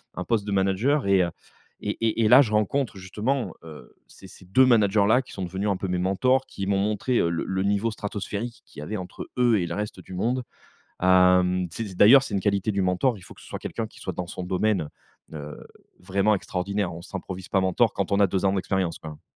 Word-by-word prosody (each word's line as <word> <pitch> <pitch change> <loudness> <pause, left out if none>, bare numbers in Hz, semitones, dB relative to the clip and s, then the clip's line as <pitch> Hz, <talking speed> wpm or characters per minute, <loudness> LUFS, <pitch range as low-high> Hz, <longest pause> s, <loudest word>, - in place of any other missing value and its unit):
un 90 - -4
poste 110 -4 0
de 105 - -4
manager 100 +8 +1
et 95 -1 +4
heu, 85 - -1 0.5
et - - -2
et 115 +1 +1
et - - +5
là, 130 +3 +9
je 110 -5 0
rencontre 105 +2 0
justement, 110 +8 -2
heu, 80 -2 -12
ces 95 - -15
ces 95 - -15
2 130 +8 +4
managers-là 110 0 +4
qui - - -15
sont 95 - -5
devenus 95 +4 -3
un 95 - 0
peu 95 - -4
mes 90 0 -1
mentors, 125 +9 +2
qui 100 0 -5
m'ont 100 -1 +1
montré, 105 +4 0
heu, 85 - +2
le 85 - -2
le 95 0 -1
niveau 100 +3 +1
stratosphérique 105 +2 -5
qu'il 75 - -11
y - - -6
avait 105 +7 -4
entre 90 -2 -8
eux 120 -3 +4
et 85 - -1
le - - -4
reste 105 +1 -5
du - - -12
monde. 120 +7 -1 0.6
Hem, 90 0 +4
c'est 100 -1 -6
d'ailleurs, 130 +8 +7
c'est - - -7
une 100 - +1
qualité 100 +1 0
du 100 -1 -1
mentor, 95 +6 +1
il - - -15
faut - - -13
que - - -17
ce - - -15
soit - - -6
quelqu'un 115 - -4
qui - - -18
soit 95 - -5
dans 90 +1 -5
son 90 - -6
domaine, 90 -3 0 0.4
heu, 75 -1 -7 0.4
vraiment 100 +3 +1
extraordinaire. 95 0 -3
On 85 - -8
s'improvise 95 -1 -7
pas 95 - +2
mentor 100 +5 +2
quand 100 0 -3
on 100 - +2
a 100 - +5
2 95 +1 -1
ans 95 - +3
d'expérience, 95 -3 -1
quoi. 75 -1 -10
100 Hz, 235 wpm, -25 LUFS, 90-110 Hz, 0.6 s, là